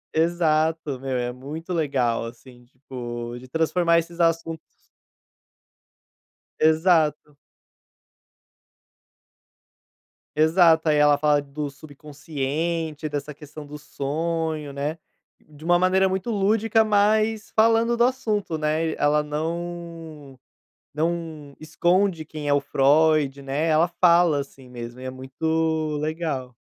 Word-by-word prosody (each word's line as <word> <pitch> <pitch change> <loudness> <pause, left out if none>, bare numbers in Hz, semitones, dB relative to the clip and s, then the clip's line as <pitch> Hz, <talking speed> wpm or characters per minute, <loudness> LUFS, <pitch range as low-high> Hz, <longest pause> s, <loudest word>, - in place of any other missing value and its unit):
Exato, 160 -3 +1
meu, 130 -1 -3
é 120 0 -2
muito 155 +7 -7
legal, 130 -8 0
assim, 120 +1 -13
tipo, 120 -2 -7
de 130 - -13
transformar 170 +4 +2
esses 170 +1 -3
assuntos 165 -1 +1 2.0
Exato. 155 -2 +2 3.0
Exato, 160 0 +4
aí 150 - +3
ela 150 0 +5
fala 145 0 +2
do 145 +1 -5
subconsciente, 150 +2 -4
dessa 145 0 -5
questão 150 0 -11
do 150 - -8
sonho, 155 +1 -3
né, 145 +4 -3 0.4
de 150 0 -17
uma 175 +1 +4
maneira 185 +1 +3
muito 190 +5 -2
lúdica 220 +2 +2
mas 215 +1 +1
falando 230 +1 +3
do 235 - +3
assunto, 215 -9 -1
né, 155 +1 0
eh, - - -6
ela 150 +1 +2
não 165 -2 -6 0.6
não 160 -2 -3
esconde 175 +2 +1
quem 150 -1 -6
é - - +2
o 145 - +3
Freud, 140 0 +2
né, 140 +4 -1
ela 160 +2 +4
fala, 170 -4 +5
assim, 135 -2 -11
mesmo 120 0 -8
e 130 - -9
é 130 - -4
muito 155 +4 -1
legal. 155 -5 -3
155 Hz, 115 wpm, -24 LUFS, 145-170 Hz, 3.0 s, ela